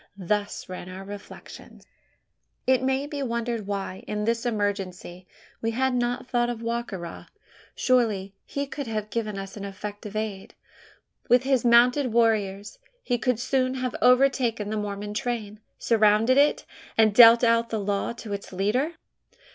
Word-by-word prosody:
Thus 205 +2 -2
ran 185 -1 -7
our 185 +1 -8
reflections. 200 +1 -11 0.8
It 260 -1 +3
may 265 +1 0
be 290 -1 -5
wondered 235 -4 -2
why, 195 -2 -4
in 210 0 -2
this 230 +1 0
emergency, 195 -4 -3 0.3
we 225 - 0
had 260 +3 0
not 245 0 -1
thought 240 -2 +1
of 235 -1 -5
Wa 235 +1 -1
ka 235 -4 -8
ra: 170 -2 -8 0.5
surely 215 -7 +1
he 280 0 -4
could 280 -1 -6
have 215 -1 -4
given 215 -3 -3
us 195 0 -7
effective 205 +1 -7
aid. 215 -3 -4 0.7
With 245 +1 +5
his 265 -2 +2
mounted 245 +2 +4
warriors, 215 - 0 0.2
he 245 -2 -1
could 250 -2 0
soon 255 +1 0
have 255 -1 -3
overtaken 250 -4 +3
the - - -1
Mormon 205 0 -4
train, 215 -2 -3 0.2
surrounded 225 +3 +3
it, 290 +1 +3 0.3
and 220 -2 +5
dealt 235 +1 +8
out 230 0 +3
the 220 - -2
law 200 +1 -1
to 230 -3 -7
its 200 - -6
leader? 215 - 0
225 Hz, 155 wpm, -25 LUFS, 205-245 Hz, 0.8 s, dealt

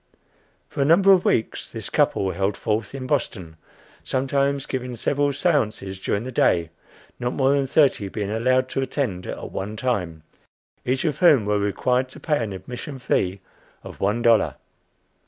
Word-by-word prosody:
For - - -4
a - - +3
number 185 +6 +6
of 185 - +2
weeks 110 - 0
this - - -6
couple 95 -1 +2
held 95 +3 -1
forth 110 +4 -2
in 130 -1 -5
Boston, 95 - -2 0.5
sometimes 140 +1 0
giving 125 -1 -4
several 145 +5 +1
séances 110 - -1
during 100 - -1
the 130 - -6
day, 85 -8 +2 0.5
not 125 0 -2
more 135 0 +2
than 140 -1 +1
thirty 135 -8 +3
being 105 0 -4
allowed 130 +4 +2
to 135 - -1
attend 125 -9 -2
at - - -6
one 105 +3 -5
time, 90 -11 -2 0.6
each 130 +1 0
of 150 -2 -1
whom 150 - +5
were 105 0 +1
required 125 +5 0
to - - -10
pay 150 -6 0
an 105 - -4
admission 125 - -7
fee 95 -6 -1 0.4
of - - -10
one 105 +4 0
dollar. 115 -2 +4
125 Hz, 165 wpm, -23 LUFS, 100-140 Hz, 0.6 s, number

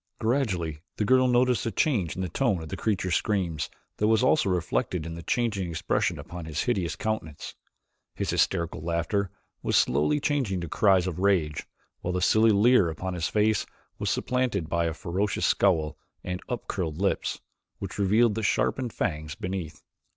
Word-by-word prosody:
Gradually 95 - 0 0.2
the 105 - -1
girl 130 +2 +5
noticed 125 -1 +3
a - - -1
change 110 - +1
in 95 - -3
the - - -1
tone 95 - 0
of 80 - -8
the - - -4
creature's 95 -4 -1
screams 85 -9 0 0.3
that 105 - +2
was 110 +2 +3
also 130 -4 +3
reflected 90 -1 -1
in 85 - -5
the 85 - -7
changing 100 -2 -1
expression 80 -1 0
upon 85 -1 -8
his 80 -1 -2
hideous 95 -10 0
countenance. 110 -9 -4 0.6
His - - -1
hysterical 85 -3 0
laughter 85 +4 -1 0.3
was - - 0
slowly 75 - +2
changing 140 - 0
into 85 -2 -3
cries 95 -1 +4
of 90 -2 -3
rage 80 -6 +1 0.3
while 90 - -3
the 90 - 0
silly 110 +5 +4
leer 105 -2 +5
upon 90 +4 -4
his 85 -2 -1
face 105 0 +2 0.4
was - - -1
supplanted 125 -9 0
by 85 +1 0
a 80 -1 -2
ferocious 95 +5 -1
scowl 80 -6 +2 0.2
and 90 0 -4
up 120 -4 -4
curled 80 -5 -3
lips, 95 +2 0 0.4
which 100 +1 -6
revealed 105 +3 +4
the 110 - -2
sharpened 120 +3 0
fangs 75 -1 -2
beneath. 90 -4 -5
95 Hz, 175 wpm, -27 LUFS, 85-110 Hz, 0.6 s, girl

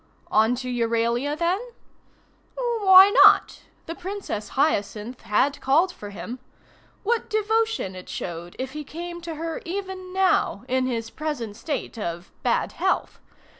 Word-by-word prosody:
On 220 +3 +4
to 255 +1 -6
Euralia 235 +4 0
then? 345 +4 +1 1.0
Why 405 -6 +6
not? - - +5 0.2
The 330 - -5
Princess 360 - -5
Hyacinth 235 -4 0
had 270 +7 +1
called 320 +8 +3
for 205 -11 -9
him. 235 +5 -7 0.6
What 455 +2 0
devotion 440 - 0
it 185 - -10
showed 175 0 -6
if 260 0 -4
he 300 +2 -6
came 345 +4 -7
to 335 -1 -6
her 325 +1 -4
even 375 0 -5
now 380 0 +1
in 255 0 +1
his 230 -3 -3
present 290 -9 -4
state 275 -2 -4
of 170 -2 -5
bad - - +1
health! - - -1
295 Hz, 135 wpm, -24 LUFS, 230-370 Hz, 1.0 s, Why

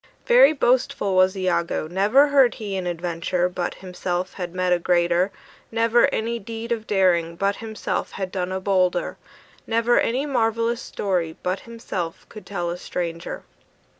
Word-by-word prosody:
Very - - +7
boastful 250 -8 +1
was 185 +1 +4
Iagoo; 170 -4 0
Never 210 - +4
heard 270 -4 +4
he 205 -3 -5
an 185 -2 -3
adventure 175 +1 -1
But 180 -1 -3
himself 180 0 -4
had 175 -2 -6
met 185 -1 +2
a 175 - +2
greater; 175 +1 +2 0.4
Never 230 +1 +4
any 230 +1 -2
deed 225 +2 -7
of 225 -2 -2
daring 175 -4 +2
But 200 +3 0
himself 220 -1 -4
had 190 -1 -4
done 185 -1 -2
a 190 - -2
bolder; 185 -2 +1 0.5
Never 230 +1 +3
any 255 +5 0
marvellous 230 -3 0
story 175 -5 -2
But 185 +2 -1
himself 185 -7 -5
could 210 -3 -11
tell 175 -4 -2
a 175 - -5
stranger. 170 -1 -4
190 Hz, 155 wpm, -23 LUFS, 180-230 Hz, 0.5 s, Very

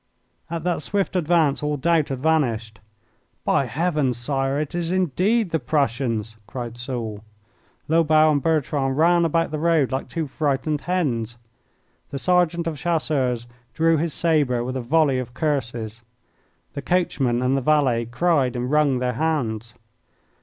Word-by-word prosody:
At 165 -1 -4
that 175 -2 -1
swift 195 +3 -1
advance 165 -4 +2
all 150 0 -1
doubt 160 +1 +2
had 135 -2 -4
vanished. 120 -8 0 0.7
"By 135 - +2
heavens, 150 -2 0
Sire, 135 +2 -1
it 150 -2 -3
is 170 -1 -2
indeed 185 - +1
the 160 - +1
Prussians!" 120 -5 -1
cried 120 -2 -6
Soult. 120 -4 -5 0.7
Lobau 155 -1 +4
and 145 -2 +1
Bertrand 140 -3 0
ran 170 +2 +4
about 165 0 +1
the 155 - -3
road 160 -4 +2
like 130 - -3
two 165 -2 -2
frightened 145 +1 -1
hens. 120 -11 -1 0.7
The 140 - -5
sergeant 175 +1 +2
of 160 -4 -3
Chasseurs 135 -8 0 0.3
drew 165 0 +3
his 160 0 -2
sabre 145 -8 +1
with 130 +1 -4
a 130 - -2
volley 140 +1 +2
of 125 -1 -7
curses. 120 -7 -2 0.7
The 140 - -5
coachman 135 -7 0
and 130 +1 +2
the 135 - 0
valet 130 -5 +2
cried 130 0 +1
and 125 +2 -2
wrung 150 -3 +3
their 125 0 -1
hands. 115 -6 -2
145 Hz, 150 wpm, -23 LUFS, 125-165 Hz, 0.7 s, Lobau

